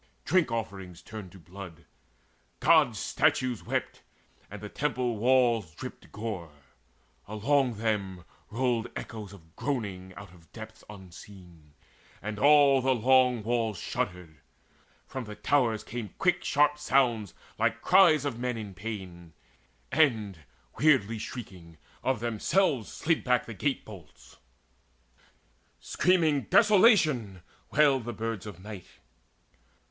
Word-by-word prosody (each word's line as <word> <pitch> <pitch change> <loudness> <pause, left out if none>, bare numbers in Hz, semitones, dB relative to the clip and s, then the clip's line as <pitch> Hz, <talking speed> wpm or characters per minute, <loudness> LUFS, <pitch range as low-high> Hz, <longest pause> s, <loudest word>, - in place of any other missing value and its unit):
Drink 180 -9 +2
offerings 95 -6 -5
turned 105 -5 -9
to - - -12
blood, 85 -1 -11 0.7
Gods' - - +4
statues 125 -4 0
wept, - - -3 0.5
And - - -8
temple 125 -5 -1
walls 120 -7 +2
dripped - - -9
gore: 100 -8 -6 0.7
along 125 +4 +1
them 100 -5 -2 0.3
rolled 120 0 0
Echoes 105 -4 -7
of 80 -5 -17
groaning 100 -9 -4
out 100 -3 -11
of 85 -3 -20
depths 110 -1 -10
unseen; 90 -5 -14 0.4
And 105 0 -6
all 140 -1 +6
the 130 0 +2
long 125 -1 +3
walls 115 -2 -1
shuddered: 85 -3 -4 0.7
from 130 -2 -6
the 105 0 -8
towers 115 0 +1
Came 115 -3 -7
quick 180 -2 +1
sharp 150 +1 +2
sounds 120 - +1 0.2
like - - 0
cries 170 -6 +5
of 125 -5 -3
men 125 -1 -2
in 105 -3 -7
pain; 90 -5 -8 0.6
And, 110 - +2 0.4
weirdly 125 -8 +3
shrieking, 90 -10 -9 0.2
of 130 -4 -1
themselves 120 - 0
slid 165 0 0
back 125 -1 +1
The 115 - -7
gate 135 +6 -2
bolts. 75 - -14 1.4
Screaming 160 -6 +1
"Desolation!" 180 - +4 0.3
wailed 140 -5 +3
The 120 - -4
birds 110 -1 -4
of 95 -4 -9
night. 105 -4 -9
110 Hz, 120 wpm, -28 LUFS, 95-130 Hz, 1.4 s, all